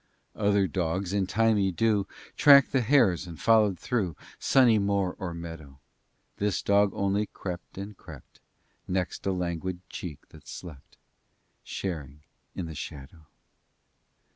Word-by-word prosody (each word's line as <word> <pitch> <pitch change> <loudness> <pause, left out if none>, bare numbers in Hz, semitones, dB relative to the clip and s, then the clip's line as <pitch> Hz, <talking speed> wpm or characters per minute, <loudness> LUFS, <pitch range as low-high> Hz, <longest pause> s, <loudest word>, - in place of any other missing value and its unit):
IX - - -11
Other 100 -1 +3
dogs 90 +2 -2
in 100 -2 +1
thymy 105 -1 +2
dew 105 0 +1 0.3
Tracked 140 -2 +7
the 135 - +2
hares, 110 - +3
and 85 -2 -9
followed 110 -4 +4
through 95 - -2 0.2
Sunny 120 -5 +4
moor 100 -2 0
or 90 -2 -4
meadow: 80 -5 -9 0.6
This 100 -1 -1
dog 100 0 +4
only 100 +1 0
crept 90 -1 -7
and 100 +2 -6
crept 80 -9 -14 0.5
Next 90 +1 -2
a - - +2
languid 90 -1 -3
cheek 80 -6 -7
that - - -16
slept, 75 -6 -10 0.7
Sharing 75 -6 -5 0.3
in 90 - -3
the 80 - -7
shadow. 75 +2 -9
95 Hz, 135 wpm, -28 LUFS, 85-105 Hz, 0.7 s, Tracked